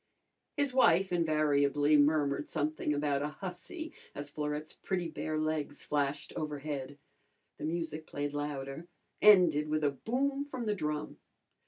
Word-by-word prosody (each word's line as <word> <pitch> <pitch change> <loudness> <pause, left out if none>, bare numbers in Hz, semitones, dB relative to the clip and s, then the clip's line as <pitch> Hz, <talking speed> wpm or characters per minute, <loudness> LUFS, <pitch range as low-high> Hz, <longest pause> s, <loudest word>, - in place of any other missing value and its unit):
His 285 -3 +1
wife 190 -7 +4
invariably 150 -3 +3
murmured 145 -1 +3
something 155 -1 -1
about 145 -1 +1
a 145 - 0
hussy 190 - -6 0.2
as 145 0 -6
Florette's 150 +1 -3
pretty 180 -3 -2
bare 155 0 -3
legs 155 -2 -2
flashed 145 0 -1
overhead. 145 -2 -4 0.6
The - - -3
music 160 -1 -3
played 145 0 -3
louder, 145 +1 -4 0.3
ended 175 -8 +6
with 155 0 0
a 145 - +3
boom 270 - -1
from 260 -4 -5
the 210 - +1
drum. 150 -5 -3
150 Hz, 135 wpm, -32 LUFS, 145-175 Hz, 0.6 s, ended